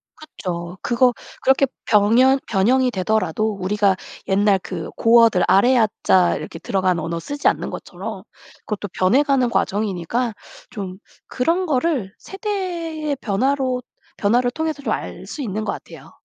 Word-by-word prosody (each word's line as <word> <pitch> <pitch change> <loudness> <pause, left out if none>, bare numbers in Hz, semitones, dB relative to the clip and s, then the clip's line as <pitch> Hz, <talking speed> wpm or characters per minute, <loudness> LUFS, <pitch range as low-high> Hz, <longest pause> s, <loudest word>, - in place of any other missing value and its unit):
그쵸. 180 - -6
그거 245 +1 +3 0.3
그렇게 265 +1 +4 0.2
병현 235 +6 +4
변형이 245 +5 +3
되더라도 215 0 0
우리가 195 +1 +1 0.3
옛날 200 0 +3
그 170 -4 -5
고어들 230 -5 +5
아래아 220 +5 +5 0.2
자 180 -2 +4
이렇게 165 - -7
들어간 185 -2 0
언어를 165 +1 -3
쓰지 285 - -2
않는 - - +1
것처럼 - - -7 0.4
그것도 205 -1 -4
변해 210 +10 +4
가는 270 -4 +2
과정이니까 210 +3 -1 0.4
좀 190 -4 -6 0.3
그런 335 +8 0
거를 265 - 0
세대의 345 -7 -4
변화로 255 +4 0 0.4
변화를 245 +4 +2
통해서 315 +1 -3
좀 - - 0
알 - - -5
수 300 - -7
있는 215 -4 -3
것 - - -1
같아요. - - -12
230 Hz, 305 characters per minute, -21 LUFS, 195-270 Hz, 0.4 s, 고어들